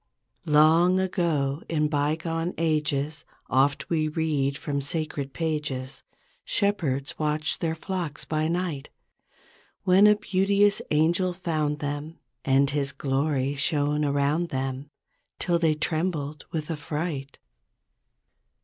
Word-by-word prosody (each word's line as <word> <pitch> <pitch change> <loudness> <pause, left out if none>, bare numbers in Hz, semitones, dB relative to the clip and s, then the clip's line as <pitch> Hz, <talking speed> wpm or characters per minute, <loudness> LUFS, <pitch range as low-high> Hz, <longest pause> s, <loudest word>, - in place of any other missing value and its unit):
"Long 160 +5 +5
ago, 165 -6 0
in 150 -2 +1
bygone 160 +3 -1
ages. 150 -2 0 0.3
Oft 135 +2 +2
we 155 -2 +1
read 150 -3 0
from 140 -1 -2
sacred 145 -1 -3
pages. 150 -5 -3 0.4
Shepherds 155 -10 -1
watched 150 0 0
their 160 -1 0
flocks 175 -3 -4
by 155 0 0
night. 170 -4 -2 0.9
When 190 +3 +6
a 210 - +6
beauteous 200 0 +2
angel 170 +4 +2
found 155 -4 -1
them, 145 +3 -4 0.3
And 135 +1 +3
his 140 -1 0
glory 140 0 0
shone 150 +1 +1
around 145 +4 +1
them, 135 +1 -3 0.5
Till 175 -2 +1
they 160 -2 +3
trembled 155 -2 -2
with 155 0 -3
affright. 150 -2 -4
155 Hz, 110 wpm, -26 LUFS, 145-165 Hz, 0.9 s, When